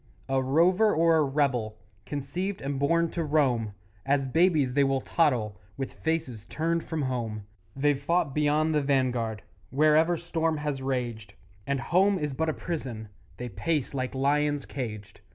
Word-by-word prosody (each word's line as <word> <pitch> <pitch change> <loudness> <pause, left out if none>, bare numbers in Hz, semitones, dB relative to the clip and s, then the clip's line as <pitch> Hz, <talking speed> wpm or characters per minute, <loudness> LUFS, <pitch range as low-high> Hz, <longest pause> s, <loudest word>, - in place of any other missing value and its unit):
A 135 0 +1
rover 180 +10 +3
or 165 0 +4
a 155 - +4
rebel, 135 -6 0 0.3
Conceived 175 +8 -3
and 135 0 -3
born 170 +3 +2
to 170 - -2
roam, 130 -9 +1 0.3
As 135 0 +1
babies 155 -2 +2
they 140 +1 +4
will 135 -1 +1
toddle 115 - +1 0.2
With 135 -1 -4
faces 130 -10 -3
turned 165 +1 -1
from 160 -3 -3
home; 115 -5 -3 0.3
They've 140 0 +1
fought 170 -1 +1
beyond 150 +2 +2
the 150 - +2
vanguard 125 -6 0 0.3
Wherever 155 +5 +3
storm 165 -1 -1
has 150 -2 -3
raged, 120 -6 -3 0.3
And 140 -1 0
home 190 +9 +3
is 150 -4 -2
but 160 +4 -1
a - - 0
prison 125 -12 -5 0.3
They 125 0 -5
pace 150 - -2
like 130 -1 -3
lions 145 +1 +1
caged. 110 -6 -6
140 Hz, 155 wpm, -27 LUFS, 130-160 Hz, 0.3 s, or